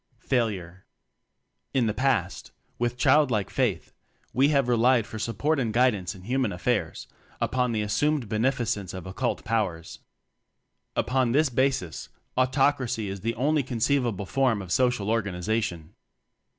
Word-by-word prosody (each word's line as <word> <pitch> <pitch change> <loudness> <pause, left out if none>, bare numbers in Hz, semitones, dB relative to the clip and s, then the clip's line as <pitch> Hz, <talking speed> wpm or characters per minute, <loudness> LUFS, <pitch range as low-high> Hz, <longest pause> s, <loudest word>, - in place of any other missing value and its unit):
Failure. 100 -8 -2 0.9
In 130 -3 +3
the 105 - 0
past, 105 -7 -1 0.3
with 120 0 -1
childlike 125 -6 +3
faith - - -1 0.4
we 135 +3 +4
have 140 -4 +2
relied 120 -1 +3
for 110 0 -8
support 135 +8 0
and 115 -4 0
guidance 105 -6 +1
in 90 - -13
human 125 +1 0
affairs 90 -2 -1 0.3
upon 125 -1 0
the 110 -2 0
assumed 145 +4 0
beneficence 110 -4 -1
of 95 - -7
occult 120 +7 -3
Powers. 100 -7 -2 1.0
Upon 130 -2 +1
this 150 +1 +3
basis, 130 -9 -1 0.3
Autocracy 130 -4 +1
is 95 -1 -6
the 115 +2 -2
only 150 +5 +2
con 125 -2 -5
ceivable 115 -5 0
form 130 -4 +1
of 95 -3 -8
social 125 -2 +1
organization. 100 -4 -2
115 Hz, 135 wpm, -26 LUFS, 100-130 Hz, 1.0 s, we